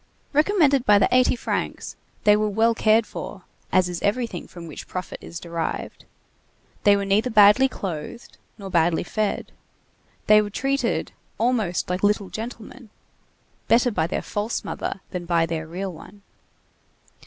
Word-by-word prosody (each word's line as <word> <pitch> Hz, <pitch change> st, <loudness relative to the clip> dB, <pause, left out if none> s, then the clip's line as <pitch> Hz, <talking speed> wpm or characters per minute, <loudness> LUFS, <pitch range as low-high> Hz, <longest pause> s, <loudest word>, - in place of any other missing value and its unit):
Recommended 300 Hz, -4 st, +3 dB
by 210 Hz, -4 st, +5 dB
the 200 Hz, -, +4 dB
eighty 255 Hz, 0 st, +4 dB
francs, -, -, -4 dB, 0.3 s
they 210 Hz, -1 st, +6 dB
were 215 Hz, 0 st, +1 dB
well 225 Hz, +3 st, +2 dB
cared 220 Hz, 0 st, +3 dB
for, 195 Hz, -3 st, -8 dB, 0.3 s
as 185 Hz, -1 st, +3 dB
is 175 Hz, -1 st, -5 dB
everything 210 Hz, -3 st, -1 dB
from 175 Hz, -1 st, -10 dB
which 155 Hz, -, -9 dB
profit 185 Hz, 0 st, -6 dB
is 165 Hz, -, -8 dB
derived; 170 Hz, -1 st, -5 dB, 0.8 s
they 205 Hz, -1 st, +6 dB
were 200 Hz, -, -2 dB
neither 205 Hz, +5 st, +2 dB
badly 215 Hz, +4 st, +6 dB
clothed, 185 Hz, +1 st, -7 dB, 0.2 s
nor 195 Hz, -3 st, -8 dB
badly 170 Hz, -1 st, +2 dB
fed; 210 Hz, +3 st, -2 dB, 0.7 s
they 215 Hz, 0 st, +6 dB
were 210 Hz, -, -4 dB
treated 270 Hz, +6 st, -1 dB, 0.3 s
almost 225 Hz, -7 st, 0 dB
like 180 Hz, +1 st, -2 dB
"little 205 Hz, -2 st, +1 dB
gentlemen,"—better 235 Hz, +1 st, -4 dB
by 160 Hz, -6 st, 0 dB
their -, -, -3 dB
false 210 Hz, +3 st, -3 dB
mother 195 Hz, -, -4 dB
than 180 Hz, -1 st, -4 dB
by 170 Hz, -1 st, +2 dB
their 160 Hz, -1 st, -4 dB
real 185 Hz, +3 st, -5 dB
one. 200 Hz, +5 st, -14 dB
205 Hz, 145 wpm, -23 LUFS, 180-230 Hz, 0.8 s, they